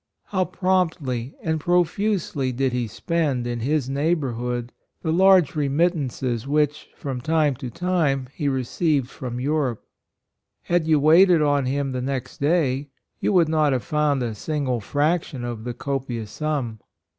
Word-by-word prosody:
How 185 -2 +1
promptly 160 -11 -1
and 160 -1 0
profusely 175 -4 0
did 130 +1 0
he 125 -2 -1
spend 145 - -1
in 120 -1 -2
his 140 +2 0
neighborhood 125 -5 -1 0.3
the 160 -2 0
large 185 -3 +5
remit 150 +4 +2
tances 130 -5 -3
which, 150 0 0
from 130 -3 -5
time 155 0 +2
to 125 - -6
time, 150 -4 0
he 150 - -2
received 135 +1 0
from 125 -1 -5
Europe. 135 -4 -1 0.8
Had 170 -2 +1
you 155 -2 +4
waited 165 +2 +6
on 145 -3 +2
him 140 +1 -1
the 130 -1 -3
next 130 -1 -4
day, 145 -3 +1 0.3
you - - +1
would 175 -4 +5
not 155 -3 +2
have 125 - -1
found 150 -3 +1
a 115 -2 -2
single 130 +1 -2
fraction 145 - -1
of 120 -2 -5
the 120 - -3
copious 125 -5 -4
sum. 135 -6 -2
140 Hz, 150 wpm, -23 LUFS, 125-160 Hz, 0.8 s, waited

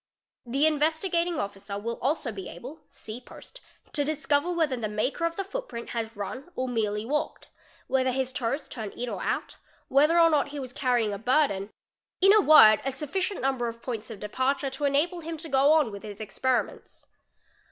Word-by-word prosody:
The 275 +5 +2
Investigating 325 +3 +1
Officer 200 0 -5
will 230 +3 -4
also 270 -2 0
be 195 -3 -7
able 295 +6 -10
(see 245 -3 -8
post) - - -12 0.3
to 290 - +1
discover 300 +2 0
whether 320 -6 +1
the 225 -3 -3
maker 235 +10 -1
of 335 0 -1
the 390 - -2
faot - - -5
print 235 0 -7
has 230 -1 -4
run 255 - -6
or 255 - -2
merely 215 -3 -1
walked, 295 +5 -3 0.4
whether 260 -1 +1
his 260 0 -2
toes 270 +2 -2
turn 220 -4 -6
in 245 0 -4
or - - -5
out, - - -2 0.3
whether 300 +5 +4
or 330 -1 +6
not 295 -2 +2
he 290 0 -6
was 255 -2 -6
carrying 245 -6 +1
a 200 - -5
burden, 230 -5 +1 0.5
in 390 +2 +7
a 430 - +6
word 220 - +8
a 270 - -1
sufficient 360 +8 -2
number 260 -3 0
of 230 0 -7
poim 240 -4 -3
iS 215 - -14
of 220 -3 -8
departure 265 +6 -1
to 270 +2 -3
enable 300 +6 +1
him 330 0 -6
to 325 +2 -7
go 275 0 +4
on 300 -8 +3
with 200 0 -8
his 205 -1 -9
experiments. 245 +4 -2
265 Hz, 195 wpm, -27 LUFS, 230-310 Hz, 0.5 s, word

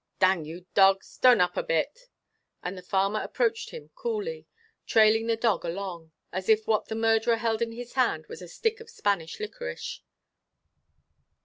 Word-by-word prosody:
Dang 185 -4 +3
you 170 +3 -9
dog. 195 -1 +5
Ston 250 -1 +4
up 180 0 +2
a - - +1
bit." - - -2 0.5
And 180 +2 -4
the 185 - -8
farmer 195 +3 0
approached 460 -1 -1
him 480 - -10
coolly, 475 -1 -4 0.4
trailing 220 +1 +4
the 230 - +2
dog 225 -2 +1
along; 170 -2 -5 0.2
as 185 +2 -4
if 220 0 +4
what 215 -1 +1
the 220 - -4
murderer 225 +1 +3
held 225 -1 -1
in 230 -1 0
his 240 +1 -8
hand 240 -12 +1
was - - -9
a 180 - -8
stick 440 - -1
of 460 0 -12
Spanish 200 - -1
liquorice. 475 +3 -6
225 Hz, 170 wpm, -27 LUFS, -, 0.5 s, dog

